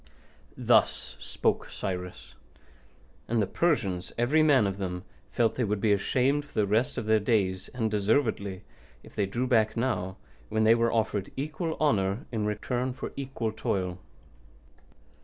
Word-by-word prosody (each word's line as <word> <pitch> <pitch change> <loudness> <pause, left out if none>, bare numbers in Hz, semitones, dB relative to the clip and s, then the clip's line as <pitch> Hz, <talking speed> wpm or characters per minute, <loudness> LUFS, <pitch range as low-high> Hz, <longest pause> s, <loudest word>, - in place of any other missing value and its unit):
Thus - - +2
spoke - - -1
Cyrus; 90 -2 -5 0.9
and 115 0 +1
the 105 - +3
Persians, 100 - 0
every 130 +7 +3
man 145 -7 +5
of 100 0 -2
them, 90 -2 -3 0.3
felt 115 -2 +2
they 125 - -1
would 105 -1 0
be 105 0 +3
ashamed 130 +8 +1
for 145 - -20
the 105 -2 +3
rest 115 +8 +1
of 115 - -2
their 110 0 +4
days, 95 -4 0
and 115 -4 -2
deservedly, 105 -3 0 0.4
if - - -15
they 100 - 0
drew 120 +6 -1
back 110 -4 +2
now, 110 -6 -1 0.3
when 110 0 +1
they 110 +1 +7
were 115 0 +2
offered 105 -3 -1
equal 155 +4 -3
honour 100 -8 +1
in 110 -3 -1
return 125 +5 -2
for - - -6
equal 130 -5 -3
toil. 90 -4 -2
110 Hz, 155 wpm, -28 LUFS, 100-125 Hz, 0.9 s, they